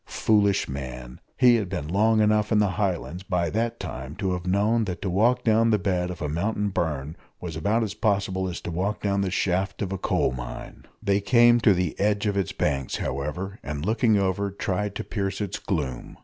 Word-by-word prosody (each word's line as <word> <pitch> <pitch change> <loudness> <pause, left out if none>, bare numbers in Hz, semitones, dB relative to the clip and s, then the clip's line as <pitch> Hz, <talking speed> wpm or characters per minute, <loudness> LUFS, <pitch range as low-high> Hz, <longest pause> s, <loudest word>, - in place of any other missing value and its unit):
Foolish 100 -2 +2
man! 65 -2 -7 0.2
he 125 -2 +6
had 105 -5 -3
been 90 -6 -4
long 110 +5 +3
enough 105 0 +2
in 110 - +4
the 105 -2 +3
Highlands 90 -3 -2
by 90 -3 -1
that 115 +2 -1
time 65 +3 -6
to 95 -2 -1
have 90 0 -4
known 105 +4 +2
that 90 -3 -4
to 95 - -1
walk 115 +7 +2
down 115 0 +3
the 110 - +4
bed 90 -2 -1
of 90 -4 -6
a - - -1
mountain 100 +7 -1
burn 75 -5 -2 0.2
was 85 -3 -6
about 105 +9 +1
as 105 -2 -3
possible 100 -3 0
as 90 - -5
to - - -5
walk 95 +5 -2
down 100 -1 +1
the 95 - 0
shaft 95 +1 -1
of 95 - -4
a 95 - -3
coal - - +1
mine. - - -8 0.2
They 100 -1 +2
came 120 +2 +5
to 105 -4 +4
the 90 -3 -1
edge 105 +1 +1
of 100 -1 0
its 100 -3 0
banks, 70 -3 -1
however, 75 +9 -4
and, 75 +1 -4
looking 110 0 +3
over, 100 +1 0
tried 100 +1 -2
to - - -3
pierce 100 -3 -3
its 100 -4 -3
gloom. 70 -9 -4
95 Hz, 210 wpm, -25 LUFS, 85-105 Hz, 0.2 s, he